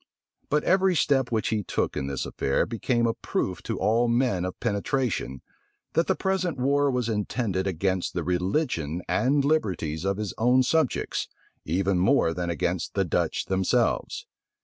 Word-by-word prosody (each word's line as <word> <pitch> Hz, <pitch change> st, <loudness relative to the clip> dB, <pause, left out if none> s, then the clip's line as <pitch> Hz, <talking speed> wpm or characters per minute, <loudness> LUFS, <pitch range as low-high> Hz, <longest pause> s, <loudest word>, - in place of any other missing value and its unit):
But 150 Hz, +1 st, +2 dB
every 190 Hz, 0 st, +3 dB
step 135 Hz, -4 st, +2 dB
which 110 Hz, -3 st, 0 dB
he 110 Hz, -1 st, 0 dB
took -, -, -2 dB
in 65 Hz, -, -2 dB
this 70 Hz, -2 st, -3 dB
affair 70 Hz, -, 0 dB
became 120 Hz, +1 st, 0 dB
a 115 Hz, -, +1 dB
proof 90 Hz, -4 st, -3 dB
to 115 Hz, -3 st, -4 dB
all 115 Hz, +5 st, +2 dB
men 115 Hz, -7 st, +1 dB
of 90 Hz, -, -5 dB
penetration, 105 Hz, -, -1 dB, 0.5 s
that 165 Hz, +2 st, +2 dB
the 190 Hz, -, +2 dB
present 190 Hz, -5 st, -1 dB
war 140 Hz, +2 st, +2 dB
was 125 Hz, -3 st, 0 dB
intended 105 Hz, -3 st, -1 dB
against 95 Hz, 0 st, -1 dB
the -, -, -1 dB
religion 90 Hz, -, -1 dB
and 135 Hz, -, +2 dB
liberties 90 Hz, -, 0 dB
of 100 Hz, 0 st, 0 dB
his 105 Hz, -2 st, -3 dB
own 125 Hz, +3 st, +4 dB
subjects, 155 Hz, 0 st, 0 dB, 0.4 s
even 95 Hz, +3 st, +1 dB
more 95 Hz, -4 st, +3 dB
than 90 Hz, +1 st, -3 dB
against 85 Hz, -4 st, -2 dB
the -, -, +2 dB
Dutch -, -, -1 dB
themselves. 95 Hz, -1 st, 0 dB
110 Hz, 160 wpm, -26 LUFS, 90-135 Hz, 0.5 s, own